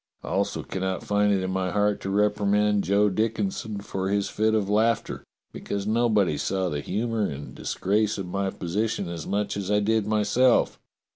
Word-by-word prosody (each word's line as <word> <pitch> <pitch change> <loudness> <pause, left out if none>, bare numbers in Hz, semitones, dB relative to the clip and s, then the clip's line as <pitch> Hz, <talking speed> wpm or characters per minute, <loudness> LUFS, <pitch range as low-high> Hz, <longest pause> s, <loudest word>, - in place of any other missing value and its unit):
I - - -6
also - - -1
cannot 95 0 -3
find 105 0 +2
it 95 -2 +1
in 95 - -2
my 95 0 -1
heart 105 +2 +1
to 95 - -4
reprimand 105 0 +2
Joe 100 +2 +3
Dickinson 110 - -2
for 95 -1 -3
his 100 0 0
fit 110 +1 +1
of 105 -3 +1
laughter, 115 +3 +1 0.3
because 100 -1 -4
nobody 105 -8 +2
saw 95 -2 -1
the 75 -2 -3
humour 110 +6 -1
and 70 0 -7
disgrace 105 +2 0
of 95 - -4
my 95 +2 -2
position 100 +3 -2
as 85 -3 -6
much 100 +1 -1
as 100 -1 -4
I 105 0 +3
did 110 0 +1
myself. 110 +4 +2
105 Hz, 175 wpm, -25 LUFS, 95-110 Hz, 0.3 s, Joe